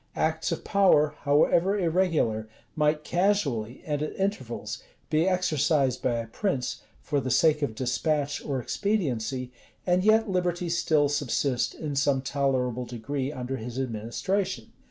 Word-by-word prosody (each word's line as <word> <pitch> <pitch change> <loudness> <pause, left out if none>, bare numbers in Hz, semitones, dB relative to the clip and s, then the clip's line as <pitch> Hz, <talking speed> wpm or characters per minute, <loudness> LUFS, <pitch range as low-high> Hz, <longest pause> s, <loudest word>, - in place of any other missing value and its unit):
Acts 160 0 0
of - - -3
power, 155 -7 +4
however 165 +7 +3
irregular, 165 - +1 0.3
might 150 0 +1
casually, 150 - 0
and 150 -2 -2
at 150 - -3
intervals, 200 - -3 0.3
be 160 +3 +3
exercised 155 -7 +1
by 125 - +1
a 115 0 -2
prince, 130 - -2 0.2
for 145 -1 0
the 130 - -3
sake 150 +4 +3
of 140 -7 -1
despatch 140 +4 -1
or 135 -3 -2
expediency, 130 - -1 0.3
and 180 0 +2
yet 220 +2 +4
liberty 180 -2 -1
still 155 -3 +2
subsist 140 -2 0
in 150 -3 -4
some 140 -1 +2
tolerable 130 -3 0
degree 130 +3 -3
under 130 -1 -4
his 120 +2 -7
administration. 130 - -2
145 Hz, 135 wpm, -27 LUFS, 130-175 Hz, 0.3 s, power